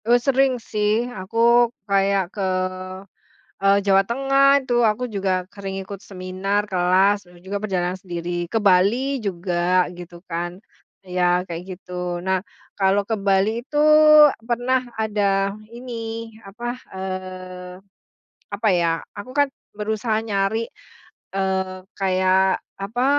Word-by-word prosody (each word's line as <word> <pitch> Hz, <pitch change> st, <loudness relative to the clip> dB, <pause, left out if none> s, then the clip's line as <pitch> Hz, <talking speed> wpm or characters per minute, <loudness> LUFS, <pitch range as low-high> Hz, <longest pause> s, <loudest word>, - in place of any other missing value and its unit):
Eee, 240 Hz, +2 st, +5 dB
sering 265 Hz, +1 st, +2 dB
sih. 215 Hz, 0 st, 0 dB
Aku, 190 Hz, +3 st, -7 dB, 0.5 s
kayak 195 Hz, -2 st, +1 dB
ke, 205 Hz, -, -5 dB, 1.2 s
eee, 195 Hz, 0 st, +5 dB
Jawa 195 Hz, -1 st, +5 dB
Tengah 275 Hz, +5 st, +3 dB
itu. 245 Hz, -3 st, +1 dB
Aku 225 Hz, +3 st, +1 dB
juga 190 Hz, -4 st, -1 dB
sering 195 Hz, -1 st, -5 dB
ikut 195 Hz, 0 st, -8 dB
seminar, 195 Hz, +2 st, -2 dB
kelas, 190 Hz, +2 st, +3 dB
dan 175 Hz, -1 st, -18 dB
juga 200 Hz, +3 st, -5 dB
perjalanan 180 Hz, -3 st, -1 dB
sendiri. 175 Hz, -1 st, -4 dB
Ke 225 Hz, -, +1 dB
Bali 220 Hz, +7 st, +2 dB
juga, 180 Hz, -1 st, +1 dB
gitu 175 Hz, 0 st, -10 dB
kan. 175 Hz, +2 st, -4 dB, 0.5 s
Ya, 180 Hz, 0 st, +1 dB
kayak 170 Hz, 0 st, -5 dB, 0.2 s
gitu. 180 Hz, -1 st, -4 dB
Nah, 190 Hz, +1 st, -1 dB, 0.3 s
kalau 195 Hz, +1 st, +2 dB
ke 225 Hz, -, 0 dB
Bali 200 Hz, +3 st, +1 dB
itu 295 Hz, +3 st, -2 dB, 0.6 s
pernah 245 Hz, +2 st, 0 dB, 0.2 s
ada 200 Hz, -2 st, +1 dB, 0.2 s
ini, 230 Hz, -2 st, -6 dB
apa, 235 Hz, +5 st, -5 dB, 0.2 s
eee, 185 Hz, -1 st, -6 dB, 0.8 s
apa 205 Hz, +2 st, 0 dB
ya, 165 Hz, -1 st, +1 dB, 0.2 s
aku 205 Hz, +5 st, -8 dB
kan 285 Hz, -, +5 dB, 0.3 s
berusaha 215 Hz, +1 st, -1 dB
nyari, 205 Hz, +2 st, 0 dB, 0.6 s
eee, 190 Hz, -1 st, -1 dB, 0.2 s
kayak 190 Hz, 0 st, +2 dB, 0.2 s
apa, 230 Hz, +6 st, -1 dB
195 Hz, 120 wpm, -22 LUFS, 185-225 Hz, 1.2 s, Eee